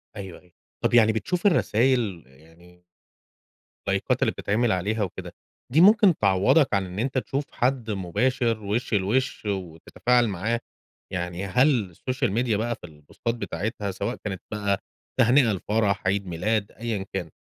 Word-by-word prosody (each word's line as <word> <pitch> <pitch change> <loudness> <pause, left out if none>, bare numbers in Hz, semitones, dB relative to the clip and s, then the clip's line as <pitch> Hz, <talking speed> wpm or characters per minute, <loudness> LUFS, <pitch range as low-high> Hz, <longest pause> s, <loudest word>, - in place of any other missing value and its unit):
أيوه 95 -4 -8
أيوه، 90 - -25 0.3
طَب - - 0
يعني 110 -2 +6
بتشوف 180 - 0
الرسايل 120 - +2
يعني 80 +6 -20 1.0
لايكات - - 0
اللي - - +3
بتتعمِل 110 +3 0
عليها 105 +4 0
وكده، 95 - -6 0.4
دي 155 +6 +5
ممكن 205 -2 +6
تعوضك 105 - +3
عن 100 -1 +1
إن 90 +2 -6
أنت 130 +3 -1
تشوف 140 +2 -2
حد 125 -3 0
مباشر 110 +4 0
وش 105 +4 -2
لوش 110 +6 0
وتتفاعل 100 +6 0
معاه، 110 +4 -1 0.5
يعني 90 +1 -3
هل 125 +3 +3
السوشيال 130 +6 -2
ميديا 115 0 +1
بقى 120 +2 -1
في - - -32
البوستات 80 +10 -5
بتاعتها، 100 0 -3
سواء 115 +6 -3
كانت 95 -3 -4
بقى 100 -2 0 0.4
تهنئة 120 -1 +5
لفرح، 100 0 0
عيد 100 0 0
ميلاد، 100 +5 -1
أيًا 110 -3 -4
كان، 90 -4 -3
105 Hz, 145 wpm, -25 LUFS, 95-120 Hz, 1.0 s, يعني